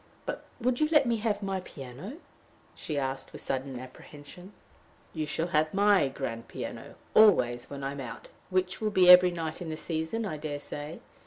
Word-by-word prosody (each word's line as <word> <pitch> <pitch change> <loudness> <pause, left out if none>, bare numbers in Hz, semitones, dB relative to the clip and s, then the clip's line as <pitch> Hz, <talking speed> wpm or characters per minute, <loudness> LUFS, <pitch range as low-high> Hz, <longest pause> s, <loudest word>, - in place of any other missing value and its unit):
" - - -31
But - - -5
would 245 0 0
you 305 0 +2
let 300 -3 +5
me 235 -1 +1
have 210 -2 -1
my 195 -1 -1
piano?" 145 - -9 0.6
she 150 - -5
asked, 135 -1 -3
with - - -9
sudden 130 -1 -3
apprehension. 145 +8 -12 0.6
"You 155 -2 -3
shall 160 +4 -2
have 155 +2 +1
my 200 -6 +5
grand 120 -4 -5
piano - - -7 0.2
always 125 - +5
when 140 -1 -7
I 135 - -2
am 140 - -7
out, 120 -4 -8 0.2
which 185 0 0
will 215 - +1
be 185 -3 +7
every 180 0 +9
night 165 -1 -4
in 170 - -5
the 155 - -4
season, 160 +8 -3
I 155 -7 -3
dare 145 -1 -4
say. 145 +2 -7
160 Hz, 190 wpm, -29 LUFS, 140-195 Hz, 0.6 s, every